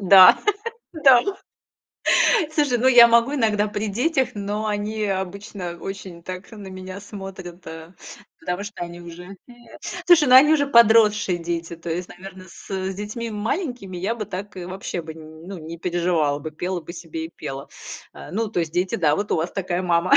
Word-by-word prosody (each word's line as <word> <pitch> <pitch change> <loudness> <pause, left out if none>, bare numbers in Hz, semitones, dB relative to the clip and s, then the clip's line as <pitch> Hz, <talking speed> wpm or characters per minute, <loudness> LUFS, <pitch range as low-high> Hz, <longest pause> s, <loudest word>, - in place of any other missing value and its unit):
Да, 190 -1 +8 0.6
да. 270 -6 +6 1.3
Слушай, 260 -4 +3
я 235 -1 +10
могу 235 +4 +3
иногда 215 -5 +1
при 210 +1 -3
детях, 260 +6 0
но 205 +1 -3
они 210 +1 -2
обычно 190 -2 -4
очень 190 -3 -8
так 185 +2 -8
на 205 -4 -10
меня 185 +1 -8
смотрят, 195 -3 -9
э, 160 +2 -10 0.5
потому 180 +2 -3
что 205 -3 -7
они 175 0 -10
уже 175 +3 -10 0.7
Слушай, 335 -6 +6
они 295 +4 +7
уже 285 -2 +3
подросшие 220 -6 +5
дети. 170 0 -4
То 170 +1 -7
есть, 175 +2 -3
наверное, 185 +1 -11
с 190 +1 -5
детьми 210 +4 -5
маленькими 220 - -3
я 195 +6 -1
бы 220 -3 -5
так 195 +3 -7
и 180 - -6
вообще 185 -1 -5
бы, 160 0 -9
ну, 160 +4 -10
не 165 +1 -8
переживала 170 -4 0
бы, 155 - -6
пела 175 +3 -4
бы 165 - -9
себе 165 -2 -6
и - - -15
пела. 135 0 -7 0.5
Э, - - -10
ну, 220 +2 -1
то 180 - 0
есть 160 -2 -3
дети, 180 +2 0
да, 155 -4 +2
вот 205 0 -2
у - - +2
вас 160 +2 -2
такая 185 -2 -2
мама, 175 0 +1
190 Hz, 175 wpm, -22 LUFS, 175-215 Hz, 1.3 s, я